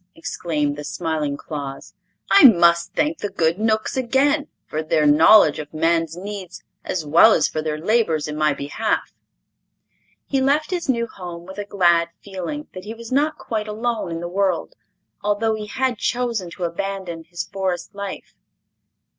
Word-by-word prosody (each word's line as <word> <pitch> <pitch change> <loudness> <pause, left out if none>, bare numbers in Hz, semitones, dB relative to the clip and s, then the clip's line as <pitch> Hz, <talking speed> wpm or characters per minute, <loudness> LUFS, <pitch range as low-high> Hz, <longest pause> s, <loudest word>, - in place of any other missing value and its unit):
exclaimed 150 -3 -2
the 150 - -6
smiling 155 -3 -2
Claus. 140 -3 -7 0.4
"I 395 - +8
must 170 -6 +5
thank 305 +1 0
the 205 - -3
good 170 -1 0
Knooks 220 0 0
again, 275 +4 +2 0.2
for 155 - -3
their 155 -1 +1
knowledge 150 +2 +6
of 150 +1 -8
man's 165 0 +1
needs 195 -2 -7 0.2
as 170 -4 -3
well 170 +9 +7
as - - +3
for 155 - -3
their 155 -1 -2
labors 165 -4 +1
in 150 - -5
my 155 0 +2
behalf." 145 +11 -2 1.1
He 270 -1 0
left 295 +5 +1
his 350 -5 -3
new 235 -2 +1
home 175 -5 -9
with 190 +2 -9
a 205 - -3
glad 175 -4 +3
feeling 200 - -6
that 185 +1 -9
he 220 +2 -6
was 230 +1 -10
not 300 +3 +1
quite 215 -2 -4
alone 220 -1 -2
in 165 0 -4
the 175 - -4
world, 190 - -1 0.5
although 210 +2 +1
he 215 -1 -5
had 255 0 -1
chosen 235 -7 -1
to 180 +2 -7
abandon 175 -1 -4
his 175 +1 -5
Forest 185 -1 -3
life. 200 -1 -7
190 Hz, 165 wpm, -22 LUFS, 165-225 Hz, 1.1 s, I